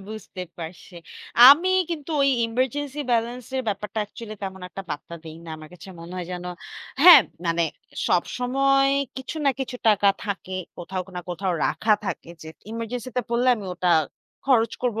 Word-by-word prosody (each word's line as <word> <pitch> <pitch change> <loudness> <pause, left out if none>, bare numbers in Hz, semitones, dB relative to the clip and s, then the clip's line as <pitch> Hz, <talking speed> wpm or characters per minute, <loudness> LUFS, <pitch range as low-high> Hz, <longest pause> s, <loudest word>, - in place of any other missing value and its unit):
বুঝতে 215 -3 -7 0.2
পারছি। 170 +2 -9 0.5
আমি 325 +7 +7 0.2
কিন্তু 320 -2 -5
ওই 275 - +4 0.2
ইমার্জেন্সি 260 +5 -2
ব্যালেন্স 235 +1 -1
এর 260 - 0
ব্যাপারটা 210 +1 -3
অ্যাকচুয়ালি 215 +1 -9
তেমন 190 -1 -5
একটা 195 - -7
পাত্তা 150 +3 -6
দেই 160 0 -9
না। 165 - -11
আমার 155 0 -12
কাছে 175 +1 -12
মনে 170 +2 -10
হয় 180 -1 -4
যেন 180 0 -6 0.6
হ্যাঁ, 355 +1 +11 0.3
মানে 170 0 +1 0.5
সবসময় 275 +8 +2 0.2
কিছু 265 +4 -6
না 280 - +5
কিছু 255 -1 -4
টাকা 205 -1 +4 0.2
থাকে। 190 -2 -4 0.2
কোথাও 185 +1 -4
না, - - -2
কোথাও 180 +1 -2
রাখা 215 -1 +2
থাকে। - - -5
যে 160 - -9 0.2
এমার্জেন্সিতে 235 +2 -4
পড়লে 240 +2 +1
আমি 210 - -8
ওটা 180 0 0 0.6
খরচ 235 -4 +3
করবো, 235 -3 0
220 Hz, 160 wpm, -24 LUFS, 185-255 Hz, 0.6 s, হ্যাঁ